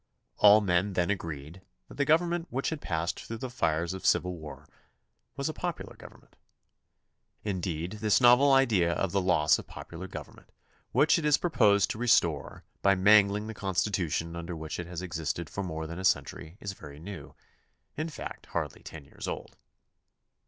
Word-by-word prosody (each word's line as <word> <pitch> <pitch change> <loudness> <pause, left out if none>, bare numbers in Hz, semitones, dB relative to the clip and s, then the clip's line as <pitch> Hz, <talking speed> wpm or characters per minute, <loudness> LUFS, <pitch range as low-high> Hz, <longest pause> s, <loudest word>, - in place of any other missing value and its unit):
All 105 +1 +7
men 95 0 +1
then 90 +1 +1
agreed 80 -2 -5 0.3
that - - -12
the 140 - 0
government 170 +3 +2
which 135 +5 -2
had 155 -2 -4
passed 85 0 -2
through 115 - -6
the 125 +2 -6
fires 85 -5 0
of 95 - -7
civil 90 +1 +2
war 80 -3 -10 0.7
was - - -1
a - - -3
popular - - -5
government. - - -16 1.1
Indeed, 90 -1 -3
this 105 -2 +4
novel 125 +3 +6
idea 110 -11 +4
of 95 0 -1
the 100 - +1
loss 85 -5 +3
of - - -10
popular 85 +3 -8
government - - -10 0.4
which - - +4
it - - -5
is 150 -1 +5
proposed 105 - +3
to 110 - -6
restore 85 - +1 0.2
by 100 0 +4
mangUng 100 +2 +5
the 110 - -6
Constitution 90 -4 -1
under 85 +1 -5
which 80 0 -6
it 85 - -5
has 90 0 -6
existed 85 -2 -4
for 100 - -3
more 80 -4 -4
than 85 +3 -7
a - - -5
century 85 -1 -1
is 100 - -4
very 75 -5 -12
new; 85 -3 -9 0.6
in 155 +2 -3
fact, 155 - -8
hardly - - -4
ten 75 -3 -10
years - - -9
old. - - -6
95 Hz, 175 wpm, -29 LUFS, 85-110 Hz, 1.1 s, All